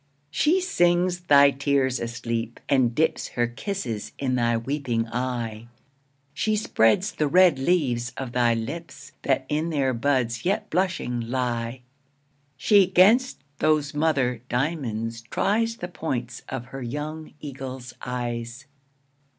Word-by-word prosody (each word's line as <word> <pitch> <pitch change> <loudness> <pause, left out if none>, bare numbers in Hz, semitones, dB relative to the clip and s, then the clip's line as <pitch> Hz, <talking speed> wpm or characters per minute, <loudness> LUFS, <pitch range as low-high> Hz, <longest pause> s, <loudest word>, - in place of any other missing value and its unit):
She 315 - +3
sings 175 - +2
thy 140 -5 +6
tears 135 -2 +1
asleep, 115 -1 -4
and 125 -4 +2
dips 160 +1 +1
Her 120 - 0
kisses 120 - -4
in 130 -2 -1
thy 120 -2 +2
weeping 120 -2 -2
eye, 120 -2 -3 0.7
She 215 +6 0
spreads 190 - +2
the 150 - 0
red 175 -2 +5
leaves 130 -7 +1
of 130 -3 -4
thy 120 -1 +3
lips, 145 +4 -6
That 135 -1 +1
in 155 +3 -1
their 140 -5 +1
buds 120 -2 0
yet 195 +3 -1
blushing 175 -9 0
lie. 120 -1 -2 0.8
She 195 +7 +5
'gainst 210 +8 +4 0.2
those 155 -2 +2
mother 140 -6 +1
diamonds 120 -5 -2
tries 225 - 0
The 175 - -5
points 125 -8 -4
of 120 - -4
her 135 - -5
young 150 +5 -5
eagle's 130 -3 -7
eyes. 120 0 -4
135 Hz, 125 wpm, -25 LUFS, 120-160 Hz, 0.8 s, thy